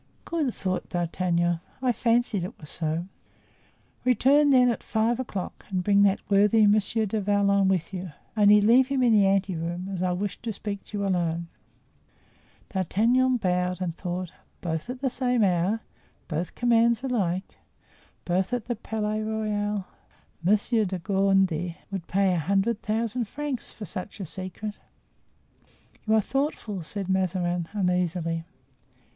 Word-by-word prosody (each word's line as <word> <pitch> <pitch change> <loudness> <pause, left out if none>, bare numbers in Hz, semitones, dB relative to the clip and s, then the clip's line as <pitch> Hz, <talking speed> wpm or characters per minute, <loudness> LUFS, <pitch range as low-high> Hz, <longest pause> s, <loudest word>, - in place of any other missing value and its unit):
"Good!" 305 -8 -1
thought 185 -1 -3
D'Artagnan; 175 0 0 0.2
"I 255 -1 +2
fancied 230 -4 +1
it 185 - -7
was 150 - -11
so." 160 +1 -2 1.0
"Return, 270 +4 +4
then, 255 -2 +6
at 230 - -4
five 225 +2 0
o'clock 200 -8 -5
and 185 -2 -1
bring 200 +1 +4
that 200 -1 +2
worthy 210 +2 +5
Monsieur 215 +2 +2
du 215 +2 -1
Vallon 200 -1 +3
with 185 -1 0
you. 185 -2 -5 0.2
Only, 210 -1 +6
leave 240 +5 +5
him 270 -2 +1
in 235 -2 +5
the 205 -2 +5
ante 195 -1 +1
room, 175 +3 -4
as 180 - -3
I 185 -1 +1
wish 195 +1 -3
to 230 - -3
speak 200 -1 -5
to 210 - -6
you 200 - -1
alone." 170 -3 -1 1.2
D'Artagnan 235 +7 +2
bowed, 180 -3 0
and 175 -3 -3
thought: 180 -1 -4 0.3
"Both 160 +4 -3
at 250 +1 -5
the 265 -3 0
same 250 -3 +1
hour; 190 +4 +1 0.5
both 170 +2 -3
commands 235 0 +3
alike; 195 -8 -1 0.7
both 185 +5 0
at 245 -3 -1
the 240 - -2
Palais 215 -1 -2
Royal. 210 -2 -2 0.6
Monsieur 215 +5 +2
de 190 -2 -2
Gondy 190 -3 +1
would 190 -4 -5
pay 195 0 +2
a 175 - +1
hundred 200 +7 +1
thousand 225 +2 -1
francs 290 0 -4
for 215 - -8
such 185 +3 -7
a 195 - -4
secret!" 185 +5 -6 1.3
"You 220 - +4
are 220 - +4
thoughtful," 235 - -2
said 195 +4 -5
Mazarin, 180 -2 0
uneasily. 180 -4 0
200 Hz, 150 wpm, -26 LUFS, 180-225 Hz, 1.3 s, then